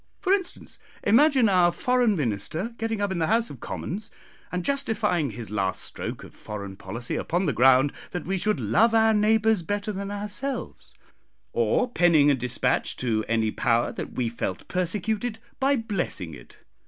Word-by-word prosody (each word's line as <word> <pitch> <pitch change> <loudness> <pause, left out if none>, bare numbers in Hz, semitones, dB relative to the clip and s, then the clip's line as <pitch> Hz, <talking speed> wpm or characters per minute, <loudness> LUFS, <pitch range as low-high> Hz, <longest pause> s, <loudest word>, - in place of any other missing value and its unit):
For 380 -1 +2
instance, 375 -3 -3 0.2
imagine 260 +2 +5
our 180 -3 +4
Foreign 245 0 +2
Minister 150 - -2
getting 225 -2 -2
up 200 -1 0
in 180 - -2
the 160 - +1
House 230 +1 +1
of 135 - -10
Commons 205 - -5 0.4
and 180 -1 -3
justifying 220 - +1
his 115 -3 -8
last 95 -3 -1
stroke - - -6
of - - -12
foreign 100 -2 -7
policy 110 +6 -5
upon 175 +3 -1
the 145 - +1
ground 130 +4 +5 0.2
that 180 - -5
we 190 +1 -1
should 215 -4 0
'love 205 - +3
our 220 0 +5
neighbours 220 -1 +3
better 205 +4 -2
than 200 0 -5
ourselves, 210 +7 -5 0.6
or 255 - +2
penning 165 -9 +4
a - - +4
despatch 125 -2 -1
to 110 -3 -1
any 110 -1 +1
power 115 +1 +1
that - - -6
we 125 -2 -1
felt 105 -5 -4
'persecuted' 210 +5 -1 0.2
by 275 +1 +3
blessing 195 - -3
it. - - -14
185 Hz, 165 wpm, -25 LUFS, -, 0.6 s, imagine